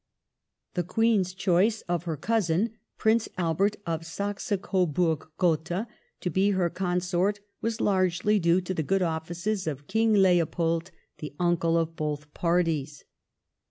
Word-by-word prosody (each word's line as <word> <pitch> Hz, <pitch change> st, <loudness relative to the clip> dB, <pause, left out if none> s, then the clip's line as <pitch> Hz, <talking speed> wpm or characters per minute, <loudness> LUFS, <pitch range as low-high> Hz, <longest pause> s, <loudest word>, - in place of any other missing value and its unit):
The 180 Hz, -, 0 dB
Queen's 200 Hz, +1 st, +2 dB
choice 195 Hz, +3 st, +2 dB
of 175 Hz, -1 st, -2 dB
her 160 Hz, -3 st, -2 dB
cousin 210 Hz, -, +1 dB, 0.3 s
Prince 220 Hz, +1 st, +2 dB
Albert 185 Hz, +4 st, +1 dB
of 165 Hz, -1 st, -2 dB
Saxe 200 Hz, +6 st, -4 dB
Coburg 170 Hz, -4 st, 0 dB
Gotha 175 Hz, +4 st, 0 dB, 0.3 s
to 180 Hz, -, -1 dB
be 190 Hz, +4 st, +3 dB
her 175 Hz, -3 st, +1 dB
Consort 180 Hz, +2 st, 0 dB, 0.2 s
was 230 Hz, 0 st, -2 dB
largely 190 Hz, +1 st, +2 dB
due 170 Hz, +1 st, +3 dB
to 185 Hz, +1 st, -3 dB
the 165 Hz, -, -1 dB
good 190 Hz, +5 st, +1 dB
offices 175 Hz, +4 st, -2 dB
of 145 Hz, -2 st, -4 dB
King 220 Hz, +4 st, +2 dB
Leopold, 170 Hz, -3 st, +2 dB, 0.3 s
the 150 Hz, -2 st, -7 dB
uncle 170 Hz, -1 st, +2 dB
of 165 Hz, 0 st, -1 dB
both 150 Hz, -1 st, -4 dB
parties. 165 Hz, -5 st, 0 dB
175 Hz, 135 wpm, -27 LUFS, 165-195 Hz, 0.3 s, be